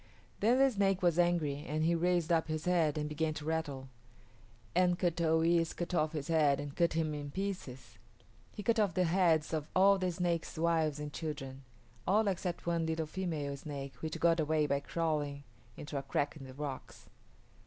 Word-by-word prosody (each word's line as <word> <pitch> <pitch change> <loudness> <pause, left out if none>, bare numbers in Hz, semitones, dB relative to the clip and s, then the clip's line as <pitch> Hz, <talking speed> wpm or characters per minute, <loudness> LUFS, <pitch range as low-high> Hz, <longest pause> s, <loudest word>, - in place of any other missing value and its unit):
Then 235 +5 +4
the 270 0 +5
snake 195 -3 +1
was 175 -1 +3
angry 160 -5 +1
and 155 +1 -1
he 165 +2 +3
raised 175 -1 +1
up 165 -1 +2
his 155 0 -3
head 165 -4 +2
and 150 0 -1
began 155 +1 -1
to 150 - -6
rattle, 150 -4 -2 0.9
and 180 0 +3
Kut 175 -2 0
o 160 0 +3
yis´ 165 0 +2
cut 175 +1 -4
off 155 -2 +1
his 150 -3 -4
head 150 -4 +3
and 145 -1 -6
cut 170 -2 +2
him 160 -1 0
in 145 -1 -5
pieces. 180 -7 -5 0.5
He 210 - -7
cut 230 0 +2
off 200 -5 +1
the 185 - +3
heads 165 -3 +2
of 155 -2 -2
all 195 +1 +5
the 185 -1 0
snake's 170 -1 -2
wives 160 -2 +1
and 150 -1 -6
children; 135 -4 -5 0.5
all 210 +3 +3
except 180 -2 -2
one 170 -1 0
little 160 0 -1
female 155 -4 -3
snake 140 -1 -7
which 155 +4 -5
got 165 0 +3
away 155 0 +2
by 140 -1 +1
crawling 145 -2 -2 0.3
into 145 0 -7
a 140 - 0
crack 140 +2 -1
in 140 -3 -10
the 130 - -11
rocks. 140 -2 -7
160 Hz, 195 wpm, -33 LUFS, 150-175 Hz, 0.9 s, the